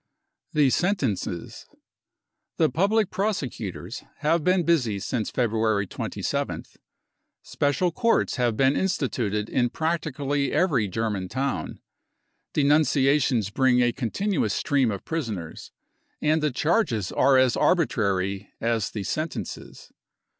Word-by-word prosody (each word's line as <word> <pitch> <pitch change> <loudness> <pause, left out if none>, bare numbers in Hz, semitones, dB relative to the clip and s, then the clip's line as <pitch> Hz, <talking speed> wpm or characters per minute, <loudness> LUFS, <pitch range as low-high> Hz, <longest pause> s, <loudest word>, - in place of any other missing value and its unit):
The 145 -4 +4
Sentences. 130 - -2 0.9
The - - +3
public 200 - +2
prosecutors 125 - -3 0.2
have 160 +1 +2
been 180 +1 +3
busy 135 -12 +1
since 110 +2 -2
February 110 -4 +1
27 - - -3
th. - - -27 0.7
Special 145 +5 0
courts 230 -4 +1
have 120 -3 +1
been 135 +1 +3
instituted 120 - -1
in 120 0 +1
practically 145 -3 -1
every 140 - +2
German 105 -2 -2
town. 135 +5 -3 0.7
Denunciations 140 -6 +2
bring 130 +1 +3
a 120 - +3
continuous 140 - -1
stream 140 -5 +1
of 100 -3 -5
prisoners; 110 - -5 0.5
and 155 +1 +2
the 150 - +2
charges 140 - 0
are 135 0 +4
as 130 -2 +4
arbitrary 100 - +1
as 115 -3 0
the 105 - -5
sentences. 155 +9 -5
130 Hz, 110 wpm, -25 LUFS, 110-155 Hz, 0.9 s, The